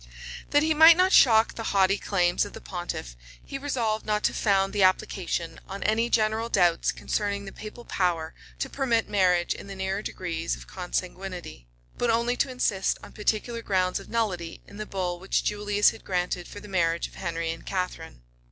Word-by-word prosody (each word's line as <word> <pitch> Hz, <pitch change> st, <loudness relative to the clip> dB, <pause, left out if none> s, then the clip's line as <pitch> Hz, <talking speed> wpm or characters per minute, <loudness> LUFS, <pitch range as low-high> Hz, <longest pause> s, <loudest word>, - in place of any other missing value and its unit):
That 290 Hz, +1 st, +4 dB
he 315 Hz, 0 st, +3 dB
might 320 Hz, +2 st, +8 dB
not 370 Hz, +1 st, +3 dB
shock 225 Hz, -3 st, +6 dB
the -, -, -6 dB, 0.2 s
haughty 195 Hz, +1 st, +4 dB
claims 175 Hz, -3 st, +1 dB
of 205 Hz, -, -7 dB
the -, -, -8 dB
pontiff, 175 Hz, -, -6 dB, 0.3 s
he 275 Hz, -, -6 dB
resolved 235 Hz, -6 st, -1 dB
not 210 Hz, 0 st, -1 dB
to -, -, +2 dB
found 195 Hz, -2 st, +2 dB
the 205 Hz, -, 0 dB
application 180 Hz, -3 st, 0 dB
on 195 Hz, +1 st, -6 dB
any 225 Hz, +2 st, +1 dB
general 220 Hz, 0 st, +1 dB
doubts 175 Hz, -6 st, +3 dB
concerning 200 Hz, -1 st, -2 dB
the 195 Hz, -, -7 dB
papal 220 Hz, +3 st, -10 dB
power 170 Hz, -4 st, -1 dB, 0.2 s
to -, -, -2 dB
permit 240 Hz, -5 st, 0 dB
marriage 180 Hz, -4 st, +2 dB
in -, -, -10 dB
the 195 Hz, -, -7 dB
nearer 190 Hz, +1 st, -2 dB
degrees 170 Hz, -5 st, -3 dB
of -, -, -12 dB
consanguinity; 180 Hz, -, -5 dB, 0.3 s
but 240 Hz, -, +1 dB
only 235 Hz, +2 st, +2 dB
to 275 Hz, -, +1 dB
insist 210 Hz, -6 st, 0 dB
on -, -, -11 dB
particular 220 Hz, +2 st, -1 dB
grounds 185 Hz, -4 st, 0 dB
of -, -, -13 dB
nullity 190 Hz, -8 st, -2 dB
in 200 Hz, -, -13 dB
the 215 Hz, 0 st, -5 dB
bull 180 Hz, -2 st, -3 dB
which 190 Hz, +2 st, 0 dB
Julius 205 Hz, 0 st, +2 dB
had -, -, -13 dB
granted 180 Hz, -1 st, -2 dB
for 205 Hz, -, -9 dB
the 210 Hz, -, -12 dB
marriage 170 Hz, -3 st, +1 dB
of -, -, -19 dB
Henry 165 Hz, -2 st, -3 dB
and 165 Hz, -, -8 dB
Catharine. 180 Hz, -, -4 dB
195 Hz, 190 wpm, -26 LUFS, 180-220 Hz, 0.3 s, might